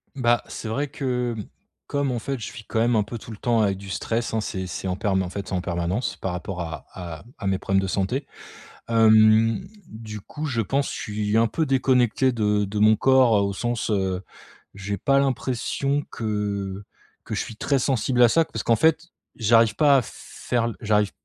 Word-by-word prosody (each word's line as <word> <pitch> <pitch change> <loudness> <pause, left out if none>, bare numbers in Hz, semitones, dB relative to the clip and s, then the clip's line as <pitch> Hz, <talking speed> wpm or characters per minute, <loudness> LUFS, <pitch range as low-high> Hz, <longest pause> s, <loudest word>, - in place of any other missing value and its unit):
Bah, 120 -3 +2
c'est - - -7
vrai 140 +7 -1
que, 125 -4 -2
mmh, 105 - -4 0.4
comme 140 -2 0
en 120 - -2
fait, 135 +3 -4
je 110 - -6
vis 115 - -10
quand 110 - -1
même 120 +1 +3
un 105 - +3
peu 110 +4 -7
tout 115 - -11
le 105 - -8
temps 115 -1 +1
avec 100 -2 +1
du 100 0 -10
stress, 115 +4 -2
hein, 110 - +1
c'est 95 -3 -4
c'est 95 - -5
en 90 - -1
perm 95 -2 +1
en 90 - -3
fait, 100 0 -6
c'est - - -6
en 90 - 0
permanence 90 +6 -2
par 95 - -3
rapport 90 +1 -5
à 80 -4 -6
à 85 -4 -8
à 100 - -4
mes 95 -1 +1
problèmes 95 0 +1
de 95 - -2
santé, 100 +9 -1 0.6
hem, 110 0 +5 0.3
du 110 -1 -8
coup, 150 +9 -6
je 125 -6 0
pense 135 +6 -1
je - - -5
suis 105 0 -1
un 115 - +4
peu 160 +8 -1
déconnecté 130 -2 +2
de 105 -3 +1
de 105 +2 -4
mon 110 +1 +6
corps, 130 -3 +4
heu, - - +3
au 100 - -1
sens, 120 +3 -2
heu, 95 -2 -1 0.5
j'ai 100 0 -4
pas 135 +8 +3
l'impression 140 +2 -1
que 100 -3 -3 0.4
que - - -5
je - - -1
suis 110 - -7
très 140 +5 0
sensible 125 -1 +1
à 120 - +7
ça. 165 +6 +3
Parce - - -5
qu'en 115 - +3
fait, 160 +6 +2 0.3
j'arrive 115 -1 +4
pas 145 -2 +5
à - - +3
faire 120 0 -4
l 115 - -2
j'arrive 105 -2 +2
110 Hz, 215 wpm, -24 LUFS, 100-125 Hz, 0.6 s, à